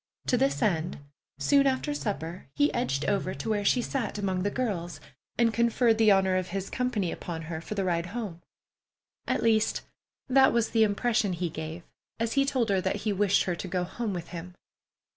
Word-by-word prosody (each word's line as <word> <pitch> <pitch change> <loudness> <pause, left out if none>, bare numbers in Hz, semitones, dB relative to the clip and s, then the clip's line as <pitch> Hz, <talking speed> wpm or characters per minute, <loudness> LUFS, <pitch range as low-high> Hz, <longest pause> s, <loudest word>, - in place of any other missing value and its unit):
To - - +2
this 265 +1 +1
end, 175 -5 0 0.4
soon 280 -1 +4
after 270 +3 0
supper 185 - -4
he 145 +1 +3
edged 135 +1 -1
over 195 -2 0
to 140 - -5
where 205 -1 0
she 245 +4 +3
sat 240 -6 -2
among 190 -3 -1
the 200 - +1
girls, 200 -8 -3 0.4
and 230 -1 +3
conferred 235 0 +3
the 220 -1 +6
honor 190 -2 +4
of 185 -1 -1
his 195 +1 -4
company 235 -8 -1
upon 165 -2 -5
her 160 0 -5
for 210 - -6
the 195 - 0
ride 175 -2 0
home; 200 -5 -5 0.9
at - - 0
least, 220 -1 +2 0.5
that 265 0 +5
was 235 -1 +1
the 225 - +3
impression 215 -1 +1
he 175 0 -2
gave 160 +2 -6 0.4
as 230 0 0
he 275 0 +3
told 260 -5 0
her 195 -2 +2
that 190 +1 0
he 210 - +2
wished 200 0 +3
her 175 - -1
to 185 - -6
go 180 0 -1
home 205 +5 -3
with 175 -3 -5
him. 180 +1 -8
200 Hz, 200 wpm, -28 LUFS, 175-230 Hz, 0.9 s, the